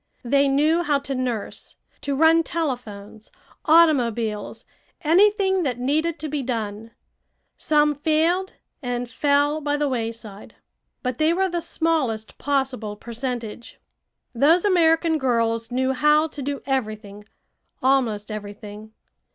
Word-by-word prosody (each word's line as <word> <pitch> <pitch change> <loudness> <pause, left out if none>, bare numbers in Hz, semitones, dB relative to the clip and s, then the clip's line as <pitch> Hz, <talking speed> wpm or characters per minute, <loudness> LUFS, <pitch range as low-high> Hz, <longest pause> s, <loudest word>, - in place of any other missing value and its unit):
They 280 +3 +3
knew 300 +5 +2
how 300 -4 +1
to 275 0 -5
nurse, 250 -5 -4 0.3
to 280 -1 -2
run 325 +3 +5
telephones, 235 -10 -5 0.4
automobiles 240 -10 +2 0.4
anything 385 +3 +3
that 260 -7 -1
needed 305 +6 0
to 310 - -3
be 295 -1 -3
done. 225 -3 -4 0.7
Some 300 -1 +2
failed 320 +6 0 0.3
and 245 -2 -3
fell 285 +5 +1
by 290 0 -1
the 295 0 0
wayside, 225 -5 -5 0.5
but 250 -1 -3
they 315 +2 +3
were 380 +2 +1
the 345 -1 -2
smallest 310 -10 -2
possible 265 -7 -1
percentage. 235 0 -6 0.5
Those 315 - +3
American 325 -4 +3
girls 230 -3 0
knew 260 +1 0
how 300 +3 +3
to 290 - -8
do 280 +1 -4
everything 215 -6 -4 0.6
almost 230 -6 +1
everything. 210 +1 -8
270 Hz, 120 wpm, -23 LUFS, 230-310 Hz, 0.7 s, run